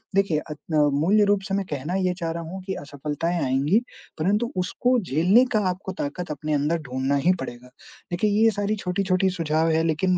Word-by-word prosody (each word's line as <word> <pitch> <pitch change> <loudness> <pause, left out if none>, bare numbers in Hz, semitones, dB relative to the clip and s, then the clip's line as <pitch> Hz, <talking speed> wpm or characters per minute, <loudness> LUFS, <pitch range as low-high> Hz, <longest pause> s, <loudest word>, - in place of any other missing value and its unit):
देखिए, 195 -6 +2
अग 150 - -4 0.2
अ, 150 - +5 0.2
मूल्य 200 +7 +4
रूप 205 -1 +2
से - - -2
मैं 200 -1 -1
कहना 150 +5 -3
ये 185 -1 +1
चाह 165 -2 -2
रहा 170 +1 -4
हूँ 185 +4 -7
कि 190 - -3
असफलताएँ 150 +4 -3
आएँगी, 140 - +2 0.4
परँतु 210 +8 +1
उसको 245 +7 +1
झेलने 185 - +4
का - - +5
आपको 185 +1 -4
ताकत 165 +3 -4
अपने 150 +1 -3
अंदर 150 +3 +1
ढूँढ़ना 130 +2 0
ही 180 - +6
पड़ेगा। 120 -3 -7 0.4
देखिए, 180 +5 +1
ये 225 - +6
सारी 205 0 -1
छोटी-छोटी 185 -1 0
सुझाव 160 0 +1
है 160 0 +2
लेकिन 170 +3 +1
175 Hz, 195 wpm, -24 LUFS, 150-195 Hz, 0.4 s, ही